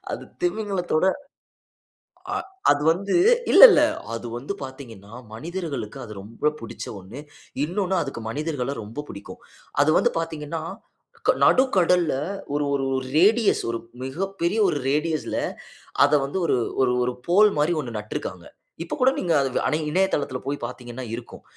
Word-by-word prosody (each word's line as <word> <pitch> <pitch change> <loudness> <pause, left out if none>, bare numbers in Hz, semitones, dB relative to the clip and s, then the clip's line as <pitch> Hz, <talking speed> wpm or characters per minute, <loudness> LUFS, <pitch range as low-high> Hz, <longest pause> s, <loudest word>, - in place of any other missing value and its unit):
அது - - -5 0.2
திமிங்கலத்தோட 195 - 0 1.3
அ - - 0 0.3
அது 145 0 +2
வந்து 195 +3 -3 0.4
இல்ல - - +8
இல்ல. 300 - +5 0.3
அது 115 +1 -5
வந்து 140 +10 -4
பாத்தீங்கன்னா, 115 -6 -11 0.2
மனிதர்களுக்கு 155 - -5
அது 110 - -9
ரொம்ப 115 +8 -1
புடிச்ச 115 - -7
ஒன்னு. 105 +10 -10 0.4
இன்னொன்னு 185 +4 -1
அதுக்கு 135 -5 -5
மனிதர்கள 145 -2 -3
ரொம்ப 115 +8 -6
பிடிக்கும். 100 - -10 0.4
அது 155 - +4
வந்து - - +3
பாத்தீங்கன்னா, 160 -1 -4 0.7
க - - +9
நடுக்கடல்ல 180 - +3 0.4
ஒரு 145 - +1
ஒரு 135 -1 0 0.3
ரேடியஸ் 215 +4 +4
ஒரு 115 - -2 0.3
மிகப்பெரிய 185 +6 -2
ஒரு 150 - 0
ரேடியஸ்ல 155 +1 -1 0.7
அத 145 - +2
வந்து 145 +8 -3
ஒரு, - - +2 0.3
ஒரு 125 -1 +3
ஒரு 125 - -1
போல் 205 +5 +6
மாரி 150 +4 +2
1 120 -5 -6
நட்டுருக்காங்க. 105 0 -6 0.4
இப்ப - - -4
கூட 255 +1 +6
நீங்க 175 - 0
அது 135 - +1
வ - - +2
ஆனா 155 - +1
இணையதளத்தில 165 -7 0
போய் 145 +1 -1
பாத்தீங்கன்னா 125 +1 -8
இருக்கும். 120 0 -9
150 Hz, 140 wpm, -24 LUFS, 130-180 Hz, 1.3 s, க